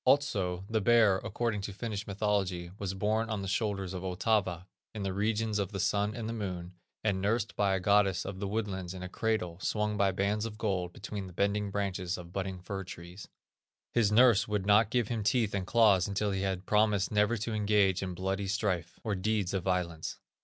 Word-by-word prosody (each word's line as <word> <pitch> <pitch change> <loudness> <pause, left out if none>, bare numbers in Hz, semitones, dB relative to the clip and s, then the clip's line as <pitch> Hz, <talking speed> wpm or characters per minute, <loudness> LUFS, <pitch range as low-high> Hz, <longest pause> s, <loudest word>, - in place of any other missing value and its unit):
Otso, 100 -10 +2
the 110 0 0
bear, 110 -3 +5
according 105 +1 -2
to 100 - -4
Finnish 105 -1 -4
mythology, 95 -4 -1
was 95 -1 -3
born 110 +3 0
on 105 -3 -2
the - - -4
shoulders 100 -2 -1
of 90 - -4
Otava, 95 -1 0 0.3
in 105 - -3
the 95 -1 -1
regions 105 +1 0
of 100 0 -2
the 100 - -4
sun 100 +3 +1
and 115 -2 -4
moon, 90 -3 -4 0.3
and 100 -3 +1
"nursed 110 +2 0
by 100 -2 +2
a - - 0
goddess 100 -1 +3
of 95 -1 -5
the 100 - -2
woodlands 95 -4 -3
in 90 - -6
a - - -4
cradle 95 -4 -1
swung 105 +1 -1
by 100 -1 +3
bands 100 +3 0
of 105 -1 -9
gold 95 -5 -1
between 100 +1 -6
the 90 - -11
bending 100 +2 0
branches 95 -3 -2
of 90 -1 -10
budding 95 -1 -3
fir 95 +2 -5
trees." 90 +1 -10 0.7
His 110 -4 +3
nurse 115 -2 +6
would 105 -2 -1
not 105 +1 +5
give 120 -2 +1
him 115 -3 -1
teeth 110 0 +2
and 95 -2 -2
claws 105 -5 +5
until 100 +1 -1
he 95 -1 -1
had 95 -1 -2
promised 105 -2 +2
never 105 +2 +2
to 110 +2 -3
engage 100 -3 +2
in 90 -2 -4
bloody 95 +2 -2
strife, 95 -4 -1
or 110 - -1
deeds 100 0 0
of 95 - 0
violence. 85 -3 -2
100 Hz, 205 wpm, -31 LUFS, 95-105 Hz, 0.7 s, nurse